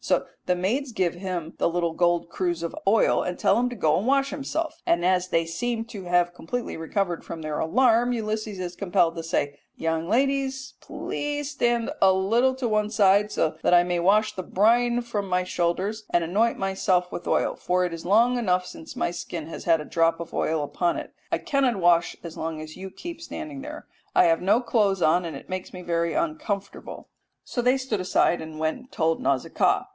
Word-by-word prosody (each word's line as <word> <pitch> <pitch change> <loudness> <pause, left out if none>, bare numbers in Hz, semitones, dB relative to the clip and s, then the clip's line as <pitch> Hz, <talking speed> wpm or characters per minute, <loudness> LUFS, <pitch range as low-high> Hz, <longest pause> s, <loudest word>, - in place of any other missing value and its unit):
So - - +1 0.2
the 180 - +3
maids 235 +9 -1
give 185 -4 +1
him 175 -3 -5
the - - +2
little 170 -1 -1
gold 175 0 +1
cruse 175 -1 -2
of 170 - -4
oil 220 +3 +4
and 180 - -3
tell - - +3
him 250 +1 +1
to 245 - -7
go 160 -7 +2
and 210 - -3
wash 275 +1 +2
himself, 300 +3 -3
and 175 +1 +1
as 185 0 +2
they 165 -2 +1
seem 230 +7 -2
to 210 -5 -9
have 175 0 +2
completely 235 +8 -4
recovered 170 +2 -2
from 160 -1 -7
their 155 -1 -3
alarm, 240 +6 +3
Ulysses 215 -3 -3
is 180 -1 -4
compelled 175 -3 +1
to 165 - -4
say, 145 -3 -2 0.2
"Young 165 +1 -2
ladies, 270 +1 0
please 290 -1 -4
stand 240 -4 0
a 190 - +7
little 230 +8 +2
on 240 - +1
one 210 0 +1
side, 205 -1 +4
that 160 -1 +1
I 175 - +6
may 175 0 -1
wash 210 +5 +3
the 185 - -3
brine 235 +6 +2
from 215 -4 -3
off - - -9
my 180 0 +1
shoulders 185 +5 -1
and 175 - +2
anoint 210 +8 +1
myself 190 -2 0
with - - -6
oil; - - +1
for 180 0 0
it 175 - -3
is 165 - -7
long 230 +6 +4
enough 180 -5 +1
since 160 - -10
my - - -1
skin 170 -2 -6
has 165 - -8
had 165 -2 +4
a 150 - -6
drop 165 +1 +1
of 170 - -7
oil 155 -1 0
upon 170 +4 -1
it. - - -7 0.2
I - - +2
cannot 270 -4 +1
wash 175 -2 +3
as 170 -2 -8
long 160 -1 -4
as 155 0 -8
you 190 +1 -7
keep 335 - -8
standing 310 -4 -7
there. 300 +2 -8 0.3
I - - +7
have 165 -1 +3
no 200 +6 +3
clothes 205 -6 +1
on, 175 +3 +3
and 160 -4 -5
it - - -13
makes 185 0 -5
me 180 -1 -9
very 170 -1 0
uncomfortable." 305 - -3 0.4
So 245 - -3
they 250 +2 +3
stood 260 -7 -2
aside 180 -1 +2
and 160 -1 -8
went 155 0 0
and 255 +1 -18
told 165 0 0
Nausicaa. 135 -2 +1
185 Hz, 210 wpm, -25 LUFS, 170-235 Hz, 0.4 s, a